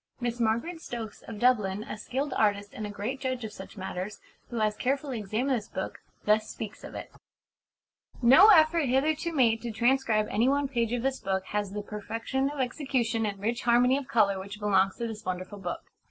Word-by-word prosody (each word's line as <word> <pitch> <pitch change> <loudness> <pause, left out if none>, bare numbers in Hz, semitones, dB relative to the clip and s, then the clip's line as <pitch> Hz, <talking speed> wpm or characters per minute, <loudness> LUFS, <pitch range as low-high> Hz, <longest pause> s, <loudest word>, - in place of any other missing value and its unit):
Miss 240 -1 -2
Margaret 235 +10 0
Stokes, 225 -7 -6
of 225 - -7
Dublin, 210 -4 +2
a 215 - -6
skilled 260 +6 -3
artist 205 -1 +1
and 215 - -5
a - - -7
great 210 +6 -4
judge 255 -2 -2
of 215 -1 -6
such 195 +1 -10
matters, 190 +1 -5 0.3
who 240 - -7
has 215 -1 +1
carefully 270 0 -1
examined 225 +7 0
this 215 -4 -4
book, 190 - -5 0.3
thus 215 +1 +3
speaks 215 -2 -7
of - - -9
it: - - -7 1.1
"No 265 - +8
effort 320 -4 +6
hitherto 300 +6 +1
made 235 -7 +3
to 240 - -4
transcribe 235 -1 +2
any 235 +5 +3
one 285 0 +1
page 235 -4 -1
of 245 -1 -1
this 270 0 0
book 190 0 -2
has 205 -1 -2
the 210 0 -4
perfection 225 +6 -2
of 290 -1 -7
execution 250 -4 0
and 200 -1 -4
rich 230 +4 -1
harmony 245 +2 +4
of 280 -2 -3
colour 200 -4 +3
which 200 +2 -8
belongs 195 -2 +2
to 235 - -3
this 220 -1 -7
wonderful 185 +2 -4
book. 180 -2 -4
230 Hz, 200 wpm, -28 LUFS, 210-260 Hz, 1.1 s, No